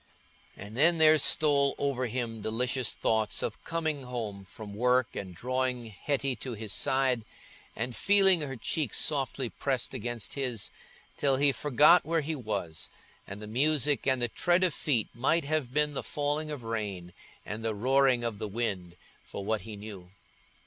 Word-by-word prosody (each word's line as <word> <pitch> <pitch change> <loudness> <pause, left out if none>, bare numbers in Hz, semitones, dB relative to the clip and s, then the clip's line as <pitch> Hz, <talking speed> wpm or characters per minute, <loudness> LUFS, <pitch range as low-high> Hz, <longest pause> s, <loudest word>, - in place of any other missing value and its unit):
And 100 +3 -9
then 165 +6 +5
there 155 -1 +6
stole 140 -1 +4
over 130 -3 -1
him 115 -2 -4
delicious 125 +3 -1
thoughts 110 -1 0
of - - -4
coming 160 -3 -2
home 115 -6 -5
from 105 +2 -10
work, 125 +1 +1
and 95 -3 -6
drawing 125 +3 -1
Hetty 135 +4 -1
to 125 0 -6
his 110 -1 -3
side, 130 -4 +2 0.5
and 125 -1 -3
feeling 195 -4 +4
her 135 -3 -4
cheek 130 +1 -2
softly 135 -3 0
pressed 130 +1 -2
against 120 -2 -4
his, 125 -6 -2 0.5
till 135 -2 +2
he 140 +1 +4
forgot 150 +5 +5
where 165 +1 0
he 155 +2 -3
was, 100 - -4 0.4
and 100 +2 -8
the - - -5
music 145 +5 +2
and 130 -1 +3
the 120 - +1
tread 175 +9 +1
of 180 -4 +2
feet 125 -8 0
might 140 +7 +1
have 150 -4 -1
been 150 +1 +1
the - - -3
falling 150 +1 -2
of 145 -5 -6
rain 100 -6 -4 0.3
and 105 +2 -5
the 110 -1 -1
roaring 130 +2 +3
of 115 -3 -3
the 110 - -3
wind, 95 -5 -3 0.3
for 100 - -7
what 110 0 0
he 110 -1 -8
knew. 100 -3 -10
125 Hz, 170 wpm, -29 LUFS, 110-145 Hz, 0.5 s, there